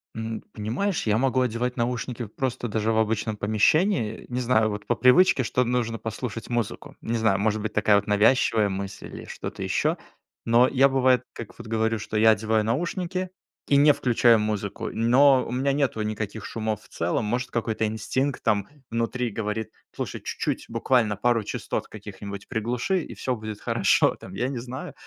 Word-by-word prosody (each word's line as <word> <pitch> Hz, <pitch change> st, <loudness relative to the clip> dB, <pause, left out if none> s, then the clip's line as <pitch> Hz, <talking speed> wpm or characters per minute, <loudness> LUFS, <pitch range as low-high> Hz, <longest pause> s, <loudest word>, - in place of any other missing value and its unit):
М, 110 Hz, 0 st, -4 dB
понимаешь, 125 Hz, -, -2 dB
я 105 Hz, +1 st, +3 dB
могу 130 Hz, 0 st, +2 dB
одевать 125 Hz, 0 st, -1 dB
наушники 120 Hz, 0 st, -2 dB
просто 120 Hz, +2 st, -3 dB
даже 110 Hz, +1 st, 0 dB
в 110 Hz, -, 0 dB
обычном 110 Hz, 0 st, 0 dB
помещении. 110 Hz, -, +1 dB
Не 125 Hz, 0 st, -2 dB
знаю, 115 Hz, -3 st, +2 dB
вот 105 Hz, 0 st, -5 dB
по 120 Hz, -, +2 dB
привычке, 130 Hz, +4 st, +5 dB
что 125 Hz, +1 st, +1 dB
нужно 120 Hz, -2 st, -1 dB
послушать 115 Hz, 0 st, -5 dB
музыку. 120 Hz, -3 st, -3 dB
Не 115 Hz, +1 st, -2 dB
знаю, 110 Hz, -4 st, +2 dB
может 110 Hz, +1 st, 0 dB
быть 110 Hz, 0 st, -4 dB
такая 105 Hz, -1 st, +4 dB
вот 100 Hz, -, -2 dB
навязчивая 105 Hz, 0 st, +3 dB
мысль, 95 Hz, +1 st, -5 dB
или -, -, -9 dB
что-то -, -, -7 dB
еще. -, -, 0 dB, 0.5 s
Но 120 Hz, +2 st, +5 dB
я 135 Hz, +1 st, +5 dB
бывает, 130 Hz, -2 st, +3 dB
как 115 Hz, -, -9 dB
вот -, -, -9 dB
говорю, 110 Hz, 0 st, 0 dB
что 110 Hz, -, -6 dB
я 110 Hz, +1 st, +6 dB
одеваю 110 Hz, 0 st, +2 dB
наушники, 175 Hz, -, -2 dB, 0.4 s
и 140 Hz, -, +4 dB
не 145 Hz, +1 st, +6 dB
включаю 120 Hz, -3 st, +4 dB
музыку, 105 Hz, -2 st, -3 dB
но 130 Hz, +4 st, +5 dB
у -, -, -6 dB
меня 135 Hz, +3 st, +1 dB
нету 135 Hz, -6 st, 0 dB
никаких 105 Hz, -1 st, -4 dB
шумов 110 Hz, -1 st, -3 dB
в -, -, -19 dB
целом. 85 Hz, +6 st, -1 dB
Может 125 Hz, +4 st, -1 dB
какой-то 115 Hz, -2 st, -1 dB
инстинкт 130 Hz, +5 st, -2 dB
там 105 Hz, -3 st, +1 dB, 0.2 s
внутри 115 Hz, +1 st, -1 dB
говорит: 105 Hz, +1 st, -3 dB, 0.2 s
"Слушай, -, -, -5 dB
чуть-чуть, -, -, -3 dB
буквально 115 Hz, -2 st, +1 dB
пару 115 Hz, +1 st, +2 dB
частот -, -, -4 dB
каких-нибудь 100 Hz, -1 st, -9 dB
приглуши, 125 Hz, -, -1 dB
и -, -, -9 dB
всё 130 Hz, -, -2 dB
будет 110 Hz, -2 st, -7 dB
хорошо" -, -, +2 dB
там, 95 Hz, -, -11 dB
я 120 Hz, +6 st, -1 dB
не 135 Hz, -3 st, -4 dB
знаю. 125 Hz, +2 st, -7 dB
115 Hz, 175 wpm, -25 LUFS, 110-125 Hz, 0.5 s, я